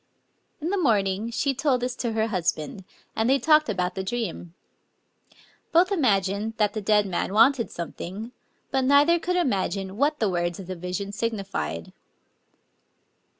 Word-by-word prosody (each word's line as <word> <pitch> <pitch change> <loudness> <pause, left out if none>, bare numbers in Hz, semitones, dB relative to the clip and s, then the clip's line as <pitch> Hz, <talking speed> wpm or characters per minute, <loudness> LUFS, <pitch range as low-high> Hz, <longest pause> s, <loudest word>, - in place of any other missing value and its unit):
In 325 +4 -2
the 400 - 0
morning 205 - +1
she 275 +4 0
told 270 -2 +1
this 250 0 -2
to 235 -3 -2
her 220 0 +1
husband; 180 -1 -2 0.3
and 220 +2 +1
they 270 - +5
talked 305 +1 +4
about 180 -3 -1
the 190 - -4
dream. 190 -6 -4 1.2
Both 355 +4 +4
imagined 210 - +1
that 210 -2 +2
the 215 - -3
dead 210 0 +3
man 190 0 -2
wanted 230 +2 +4
something; 190 +6 -6 0.4
but 265 -2 +1
neither 290 +6 +5
could 360 +2 -1
imagine 195 - -1
what 295 +4 +2
the 220 - +2
words 175 -1 -1
of 190 - -7
the 185 +1 -5
vision 180 +3 -4
signified. 200 - -3
215 Hz, 150 wpm, -25 LUFS, 190-265 Hz, 1.2 s, they